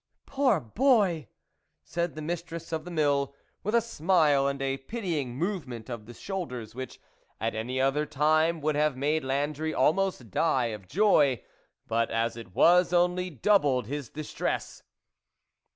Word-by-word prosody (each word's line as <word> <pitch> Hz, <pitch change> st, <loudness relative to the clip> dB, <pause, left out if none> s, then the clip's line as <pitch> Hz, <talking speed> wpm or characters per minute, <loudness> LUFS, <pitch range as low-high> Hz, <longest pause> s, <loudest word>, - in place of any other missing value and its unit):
" -, -, -60 dB
Poor 265 Hz, -8 st, +2 dB
boy! 190 Hz, -, +2 dB, 0.3 s
" -, -, -50 dB, 0.3 s
said 170 Hz, -, -3 dB
the 155 Hz, -, -6 dB
mistress 170 Hz, 0 st, -5 dB
of 160 Hz, 0 st, -3 dB
the -, -, -7 dB
mill, 145 Hz, -4 st, +1 dB, 0.3 s
with 210 Hz, +4 st, -1 dB
a 235 Hz, -, +5 dB
smile 160 Hz, -9 st, +2 dB
and 140 Hz, 0 st, -2 dB
a 135 Hz, 0 st, -1 dB
pitying 150 Hz, -, -3 dB
movement 135 Hz, -, -4 dB
of 110 Hz, -3 st, -6 dB
the 120 Hz, -, -9 dB
shoulders, 125 Hz, -, -5 dB
which, 130 Hz, +1 st, -7 dB, 0.4 s
at 115 Hz, +1 st, -1 dB
any 120 Hz, +4 st, -3 dB
other 135 Hz, +3 st, +2 dB
time, 155 Hz, +3 st, +2 dB
would 155 Hz, +1 st, +1 dB
have 150 Hz, -2 st, +1 dB
made 150 Hz, +3 st, 0 dB
Landry 145 Hz, +4 st, -1 dB
almost 155 Hz, -, +1 dB
die 125 Hz, -, +1 dB
of 100 Hz, -3 st, -9 dB
joy, 145 Hz, -, +3 dB, 0.4 s
but, 115 Hz, +1 st, 0 dB
as 115 Hz, +1 st, 0 dB
it 115 Hz, -5 st, -11 dB
was, 180 Hz, +1 st, +5 dB
only 180 Hz, +1 st, +2 dB
doubled 145 Hz, -, +2 dB
his 140 Hz, 0 st, -5 dB
dis 155 Hz, 0 st, -7 dB
tress. -, -, -3 dB
150 Hz, 160 wpm, -28 LUFS, 130-175 Hz, 0.4 s, a